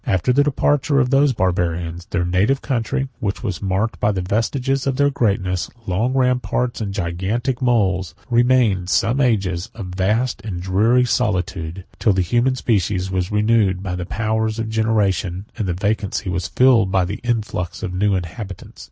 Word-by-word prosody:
After 95 +7 +1
the 145 +3 +4
departure 145 0 +1
of 130 -1 +1
those 140 +1 +4
Barbarians, 85 -4 -1
their 90 - -1
native 95 +10 +2
country, 135 +1 -1
which 100 +2 -3
was 100 -7 -3
marked 100 +3 -1
by 105 - +2
the 95 -3 -2
vestiges 130 +7 -1
of 135 - +1
their 145 +1 +2
greatness, 100 -8 0 0.2
long 110 +7 0
ramparts, 125 -2 0
and 100 -2 -2
gigantic 100 +8 -2
moles, 95 -8 +1
69 - - -28
remained, 125 -1 +4
during 90 -1 -7
some 115 +8 +2
ages, 95 -8 0
a 110 - -6
vast 100 +7 -1
and 95 -5 -4
dreary 105 +8 +3
solitude; 95 -6 -1
till 110 -4 +3
the 95 -1 +1
human 120 +7 +1
species 95 -6 0
was 95 0 -1
renewed 105 -3 +2
by 90 -2 -3
the 90 -1 -5
powers 110 0 -1
of 115 -1 -3
generation, 105 -4 0
and 105 -5 -3
the 90 - 0
vacancy 100 0 -1
was 90 -1 -2
filled 120 -7 +4
by 95 -1 +2
the 100 +4 -5
influx 110 -7 -2
of 90 - -3
new 100 +2 +1
inhabitants. 95 +2 -7
105 Hz, 175 wpm, -20 LUFS, 95-120 Hz, 0.2 s, the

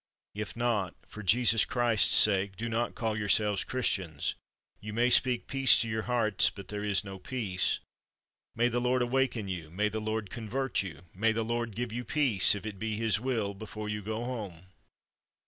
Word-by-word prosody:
If 105 +1 -5
not, 115 -6 -1
for 110 - -9
Jesus 115 +3 +4
Christ's 120 -3 +2
sake, 100 -2 +3
do 115 - -3
not 115 +1 -2
call 110 -2 -1
yourselves 105 -1 +2
Christians; 95 - -1 0.5
you 105 0 -7
may 120 +3 +2
speak 125 -1 +4
peace 135 -1 +4
to 115 - 0
your 110 -1 -2
hearts, 110 -5 +4
but 100 - -11
there 105 0 -4
is 100 -2 +2
no 95 -1 -8
peace. 100 -6 -1 0.8
May 120 +1 +3
the 120 0 -1
Lord 125 0 +2
awaken 120 -4 0
you, 85 -4 -5
may 105 +6 0
the 110 +1 -4
Lord 110 -2 -3
convert 120 +3 -2
you, 95 -5 -8
may 110 +4 +1
the 115 0 -1
Lord 115 -2 -2
give 120 -1 -4
you 120 +1 -3
peace, 125 -11 +3
if 100 - -7
it 105 -3 -6
be 110 0 -2
His 110 -2 +1
will, 115 -5 -1
before 105 +1 -7
you 105 0 -3
go 110 +3 -4
home 100 -8 -6
110 Hz, 185 wpm, -30 LUFS, 100-120 Hz, 0.8 s, Jesus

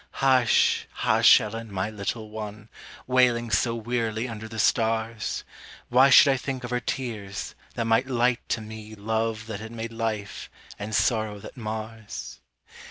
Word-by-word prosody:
Hush, 130 -3 +3
hush, - - +5
Ellen, 115 +1 -6
my 100 +2 -2
little 110 +1 -4
one, 105 0 -7 0.4
Wailing 125 -2 +3
so 115 +1 +2
wearily 115 0 -2
under 110 -2 -7
the 110 0 -9
stars; 110 0 0 0.5
Why 130 +3 +6
should 140 - +8
I - - -1
think 130 0 -4
of 120 - -6
her 125 - +1
tears, 110 -6 -4 0.2
that 115 - -1
might 115 +3 +2
light 125 -1 +2
to 110 - 0
me 110 0 -9
Love 110 +1 -2
that 110 -3 -6
had 110 +1 -8
made 115 0 -6
life, 110 -3 -4 0.3
and 105 +1 -3
sorrow 110 -3 +1
that - - -10
mars? 110 - -6
115 Hz, 155 wpm, -26 LUFS, 110-120 Hz, 0.5 s, should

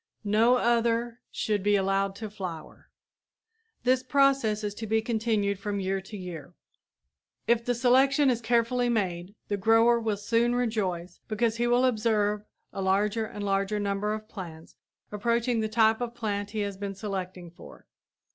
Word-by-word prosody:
No 220 +4 +4
other 235 0 +1
should 210 -3 -1
be 205 +1 +3
allowed 195 0 +1
to 215 +1 -6
flower. 180 -6 -8 0.9
This 255 0 +3
process 265 -5 +2
is 205 -1 -2
to 220 +1 -6
be 220 +1 +2
continued 220 -3 0
from 200 0 -3
year 195 0 -1
to 205 +2 -9
year. 175 -3 -8 0.9
If 235 0 +2
the 245 +1 0
selection 265 +3 +4
is 240 -1 -2
carefully 240 +1 +1
made, 190 -4 -2
the 205 - -1
grower 225 +3 +4
will 220 -3 -1
soon 235 +3 +1
rejoice, 190 -8 -2
because 225 +1 0
he 240 +1 +1
will 245 +1 +3
observe 215 -3 +1 0.3
a 195 - -4
larger 205 +4 +1
and 205 - -7
a - - -2
larger 195 +1 0
number 200 +1 -1
of 215 0 -9
plants 165 -7 -10 0.4
approaching 235 +3 0
the 220 0 -1
type 220 +1 +3
of 240 -1 -4
plant 205 -3 -3
he 215 0 -3
has 200 -1 -3
been 200 0 -5
selecting 185 -3 -5
for. 170 - -14
215 Hz, 165 wpm, -27 LUFS, 200-235 Hz, 0.9 s, No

